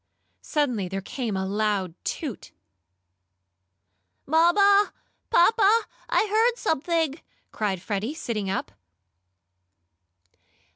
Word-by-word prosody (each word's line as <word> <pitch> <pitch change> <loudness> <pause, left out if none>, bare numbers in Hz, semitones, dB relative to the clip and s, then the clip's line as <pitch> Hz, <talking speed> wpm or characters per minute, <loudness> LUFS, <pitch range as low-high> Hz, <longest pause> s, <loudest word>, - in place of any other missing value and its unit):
Suddenly 250 -11 -1
there 195 +2 -4
came 215 +1 -4
a 190 - -2
loud 200 -3 -1
toot. - - -5 1.7
"Mamma! 395 +7 +4 0.4
Papa! 430 +4 +4 0.3
I - - +3
heard 450 +3 +2
something!" 325 - 0 0.3
cried 195 -5 -2
Freddie, 215 +8 -3
sitting 215 -10 -3
up. 190 - -3
265 Hz, 85 wpm, -25 LUFS, -, 1.7 s, Mamma